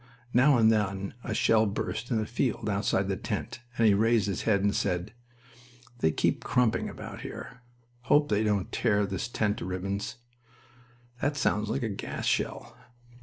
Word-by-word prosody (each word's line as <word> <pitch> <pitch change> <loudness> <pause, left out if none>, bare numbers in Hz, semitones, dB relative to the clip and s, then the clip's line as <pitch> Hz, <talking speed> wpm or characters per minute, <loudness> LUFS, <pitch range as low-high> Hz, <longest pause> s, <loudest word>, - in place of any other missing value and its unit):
Now 135 +2 +5
and 110 -1 +5
then 100 -3 -1
a 110 - -3
shell 110 0 +4
burst 110 +3 -3
in 120 - +1
the 110 - 0
field 120 -1 -1
outside 100 -1 +1
the 95 - 0
tent, 95 - -4 0.2
and 115 - +3
he 105 - +6
raised 110 0 +3
his 100 -4 -2
head 100 -2 +3
and 100 0 +2
said: 90 +2 -1 0.9
"They 80 - +3
keep 80 - 0
crumping 125 -3 +1
about - - -8
here. 125 - -8 0.4
Hope 145 +5 +4
they 105 0 +2
won't 100 -3 0
tear 105 0 +2
this 100 +3 -3
tent 110 -3 0
to - - -5
ribbons....That 120 +6 -6
sounds 105 -4 +1
like 115 - -1
a 115 - -1
gas 100 - -5
shell." - - -1
110 Hz, 170 wpm, -28 LUFS, 100-120 Hz, 0.9 s, he